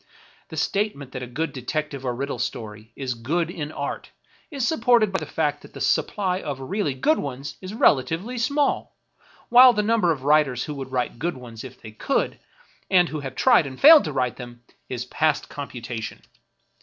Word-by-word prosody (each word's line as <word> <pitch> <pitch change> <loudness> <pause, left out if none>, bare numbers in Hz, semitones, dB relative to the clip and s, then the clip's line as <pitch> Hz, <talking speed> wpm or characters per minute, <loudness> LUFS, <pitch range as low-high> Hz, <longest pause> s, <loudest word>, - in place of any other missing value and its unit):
The - - -9
statement 195 -10 -1
that 125 - -6
a 125 - -5
good 155 +7 -3
detective 140 +1 -4
or 125 -2 -2
riddle 140 +3 -4
story 110 0 -5
is 130 -2 -3
good 160 +9 -2
in 150 -3 -5
art - - -5 0.4
is 275 -5 -1
supported 235 - +3
by 190 - 0
the - - -7
fact - - -1
that - - -15
the - - -9
supply 190 -2 0
of 140 -3 -5
really 145 +1 -2
good 310 - +2
ones 140 0 -5
is 190 +3 -7
relatively 170 - +2
small, 280 +5 0 0.5
while 250 +1 +9
the 210 -2 0
number 215 -5 +2
of 140 -5 -3
writers 145 -4 +3
who 150 - -5
would 135 -2 -7
write 125 -2 -2
good 165 0 -2
ones 115 -3 -10
if 130 -1 -11
they 110 - -10
could, 110 - -1 0.5
and 180 -2 +4
who 155 - -4
have 135 -2 -7
tried 240 - +4
and 130 -1 -9
failed 310 +1 +9
to - - -3
write 130 -3 -1
them, 120 -1 -10 0.3
is 125 -1 -4
past 150 +3 0
computation. 120 -5 -6
145 Hz, 190 wpm, -24 LUFS, 125-195 Hz, 0.5 s, while